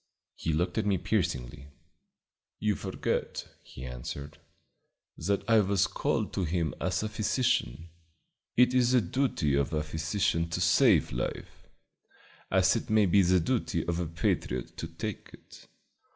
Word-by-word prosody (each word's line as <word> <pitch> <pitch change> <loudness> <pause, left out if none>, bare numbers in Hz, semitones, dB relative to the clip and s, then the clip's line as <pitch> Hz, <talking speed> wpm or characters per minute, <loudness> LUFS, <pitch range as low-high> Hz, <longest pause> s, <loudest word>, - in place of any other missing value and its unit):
He 80 - -3
looked 90 +4 0
at - - -1
me 100 -2 +2
piercingly. 70 -2 -2 0.9
"You 105 -1 +1
forget," - - -3
he 65 - -10
answered, 65 +4 -7 0.8
"that 100 0 -2
I 115 -1 +5
was 100 -1 +2
called - - -1
to 95 - -1
him 85 -3 -1
as 95 +3 0
a - - -1
physician. 105 - 0 0.7
It 125 +1 +5
is 125 -1 +3
the 125 - +5
duty 100 - 0
of 70 +3 +1
a 75 -1 0
physician 80 +2 -1
to 85 - -2
save 85 -1 +4
life, - - -5 0.8
as - - +4
it - - -3
may 110 -1 +4
be 100 +2 +5
the 90 0 +4
duty 80 - -1
of 85 0 -1
a 85 - -1
patriot 80 -6 -2
to 85 - -4
take 95 +5 -6
it. - - -15
85 Hz, 150 wpm, -29 LUFS, 75-105 Hz, 0.9 s, I